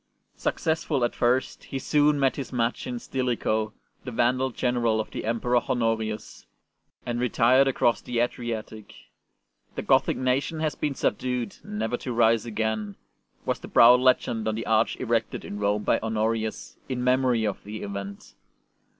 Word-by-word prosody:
Successful 160 Hz, -4 st, -1 dB
at 120 Hz, -, -2 dB
first, 125 Hz, +2 st, 0 dB
he 135 Hz, -, -5 dB
soon 145 Hz, +2 st, +2 dB
met 135 Hz, -1 st, +2 dB
his 140 Hz, -, -6 dB
match 120 Hz, 0 st, -1 dB
in 125 Hz, -1 st, -3 dB
Stilicho, 120 Hz, -4 st, -1 dB, 0.3 s
the 130 Hz, -, -5 dB
Vandal 125 Hz, +2 st, +1 dB
general 120 Hz, -3 st, 0 dB
of 110 Hz, -, -4 dB
the -, -, -5 dB
Emperor 120 Hz, +2 st, +1 dB
Honorius, 110 Hz, -3 st, -2 dB, 0.6 s
and 120 Hz, 0 st, -2 dB
retired 125 Hz, +2 st, +4 dB
across 120 Hz, -3 st, +2 dB
the 125 Hz, -, -4 dB
Adriatic. 115 Hz, -3 st, -4 dB, 0.4 s
'' -, -, -42 dB
The -, -, -3 dB
Gothic -, -, +3 dB
nation 130 Hz, +5 st, 0 dB
has 155 Hz, -1 st, 0 dB
been 145 Hz, -2 st, -2 dB
subdued, 125 Hz, -5 st, -2 dB
never 110 Hz, +3 st, -2 dB
to 125 Hz, -, -5 dB
rise 115 Hz, -1 st, +3 dB
again," 110 Hz, -2 st, -2 dB, 0.5 s
was -, -, -1 dB
the -, -, -9 dB
proud 125 Hz, +2 st, +7 dB
legend 125 Hz, -3 st, +2 dB
on 110 Hz, -, 0 dB
the 115 Hz, -, -4 dB
arch 110 Hz, 0 st, +2 dB
erected 115 Hz, -2 st, -1 dB
in 100 Hz, -, -6 dB
Rome 105 Hz, +1 st, 0 dB
by -, -, +2 dB
Honorius 110 Hz, 0 st, -2 dB
in 125 Hz, -1 st, -2 dB
memory 125 Hz, -3 st, +2 dB
of 105 Hz, -, -3 dB
the 105 Hz, +2 st, -7 dB
event. 100 Hz, 0 st, -7 dB
120 Hz, 160 wpm, -26 LUFS, 110-125 Hz, 0.6 s, proud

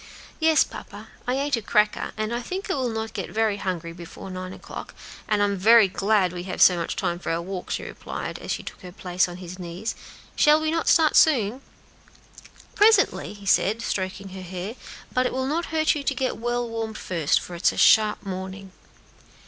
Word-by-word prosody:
"Yes, 320 Hz, -1 st, +5 dB
papa, -, -, -10 dB, 0.2 s
I 250 Hz, -, +1 dB
ate 285 Hz, 0 st, +1 dB
a -, -, -4 dB
cracker, 210 Hz, 0 st, +1 dB
and 215 Hz, +1 st, -2 dB
I 240 Hz, -, -2 dB
think 375 Hz, -, -4 dB
I -, -, +2 dB
will 260 Hz, -3 st, -1 dB
not 220 Hz, 0 st, -4 dB
get 195 Hz, -4 st, -4 dB
very 220 Hz, -2 st, 0 dB
hungry 175 Hz, -4 st, -4 dB
before 175 Hz, +2 st, -10 dB
nine 185 Hz, 0 st, -6 dB
o'clock; -, -, -9 dB, 0.3 s
and 210 Hz, -1 st, +2 dB
I'm 200 Hz, -1 st, +1 dB
very 220 Hz, +2 st, +7 dB
glad 195 Hz, -1 st, +1 dB
we 175 Hz, -, -5 dB
have -, -, -4 dB
so 180 Hz, -, +7 dB
much 170 Hz, -1 st, -3 dB
time 175 Hz, 0 st, -2 dB
for -, -, -3 dB
our 165 Hz, -, 0 dB
walk," 180 Hz, +1 st, -6 dB
she -, -, -2 dB
replied, -, -, -6 dB
as -, -, -9 dB
she -, -, -3 dB
took -, -, -9 dB
her 180 Hz, -, -9 dB
place 180 Hz, 0 st, 0 dB
on 175 Hz, -, -8 dB
his 180 Hz, 0 st, -9 dB
knee. 175 Hz, +3 st, -8 dB, 0.5 s
"Shall 300 Hz, +1 st, +5 dB
we 315 Hz, 0 st, -1 dB
not 330 Hz, 0 st, -1 dB
start 320 Hz, -2 st, +4 dB
soon?" 255 Hz, -5 st, +4 dB, 1.1 s
"Presently," 420 Hz, -, +3 dB
he 200 Hz, -1 st, -13 dB
said, 210 Hz, +4 st, +2 dB
stroking 190 Hz, 0 st, -3 dB
her 190 Hz, 0 st, -8 dB
hair; 185 Hz, +3 st, -6 dB, 0.4 s
"but 255 Hz, 0 st, +2 dB
it -, -, -5 dB
will 260 Hz, 0 st, -1 dB
not 320 Hz, +5 st, -1 dB
hurt 315 Hz, 0 st, +2 dB
you 295 Hz, -, -3 dB
to 275 Hz, 0 st, -1 dB
get 260 Hz, 0 st, -1 dB
well 240 Hz, +1 st, -1 dB
warmed 225 Hz, -1 st, -4 dB
first, 165 Hz, -5 st, +1 dB
for 180 Hz, -, -9 dB
it 170 Hz, -, 0 dB
is -, -, +4 dB
a -, -, -9 dB
sharp 215 Hz, -1 st, +5 dB
morning." 190 Hz, 0 st, -6 dB
210 Hz, 210 wpm, -24 LUFS, 185-255 Hz, 1.1 s, very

